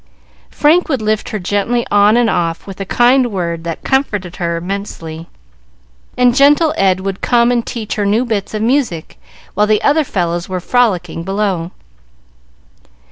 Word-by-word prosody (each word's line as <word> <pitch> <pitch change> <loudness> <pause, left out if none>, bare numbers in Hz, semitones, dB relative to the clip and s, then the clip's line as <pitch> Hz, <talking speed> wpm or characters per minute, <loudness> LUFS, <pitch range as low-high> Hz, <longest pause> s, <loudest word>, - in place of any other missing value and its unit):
Frank 320 +4 +2
would 270 -4 0
lift 215 0 -1
her 215 - -3
gently 205 +5 -1
on 205 +2 +4
and 240 -1 +3
off, 170 -5 -1
with 195 -1 -10
a - - -3
kind 245 +3 +3
word 170 -4 -3
that 165 -1 -5
comforted 205 -10 -1
her 170 -1 -2
immensely, 170 -3 -6 0.9
and 250 -1 +4
gentle 295 +3 +4
Ed 190 -1 +2
would 195 0 -4
come 240 0 +3
and 240 -1 +1
teach 220 -3 -5
her 205 - 0
new 220 +5 +1
bits 215 -2 -3
of 215 - -2
music, 235 - -1 0.3
while 210 +2 +2
the 215 -1 +1
other 300 +2 +3
fellows 175 -7 -2
were 185 -1 -2
frolicking 180 -6 0
below. 195 -3 -2
205 Hz, 160 wpm, -15 LUFS, 180-240 Hz, 0.9 s, on